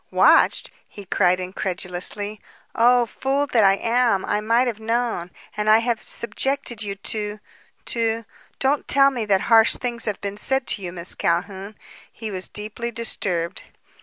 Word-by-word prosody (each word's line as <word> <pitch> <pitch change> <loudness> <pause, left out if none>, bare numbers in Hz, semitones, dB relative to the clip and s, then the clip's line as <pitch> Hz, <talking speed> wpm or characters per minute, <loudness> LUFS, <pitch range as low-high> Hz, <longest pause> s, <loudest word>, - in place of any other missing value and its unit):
"Watched?" - - +4 0.2
he 205 - -11
cried 180 0 +2
incredulously. 185 +3 -3 0.3
"Oh, 245 +1 +4
fool 270 +5 -1
that 240 -6 +2
I 195 0 +5
am! 230 -2 +1
I 210 - 0
might 230 +4 +2
have 230 -4 -3
known. 225 -5 -1 0.3
And 210 0 0
I 215 - +8
have 230 0 -1
subjected 240 +1 -2
you 200 -2 -4
to 210 +1 -3 0.5
to 230 -1 -1 0.3
don't 275 +2 0
tell 275 0 +5
me 240 -4 -3
that 195 -2 +2
harsh 225 -1 +5
things 240 -2 -4
have 210 -2 -2
been 200 0 -5
said 265 +4 +1
to 205 - 0
you, 180 -2 -5
Miss 175 0 -4
Calhoun!" 195 +4 -2 0.4
He 220 -2 -7
was 185 -1 -3
deeply 215 +3 -5
disturbed. 185 -7 -2
215 Hz, 160 wpm, -22 LUFS, 195-235 Hz, 0.5 s, I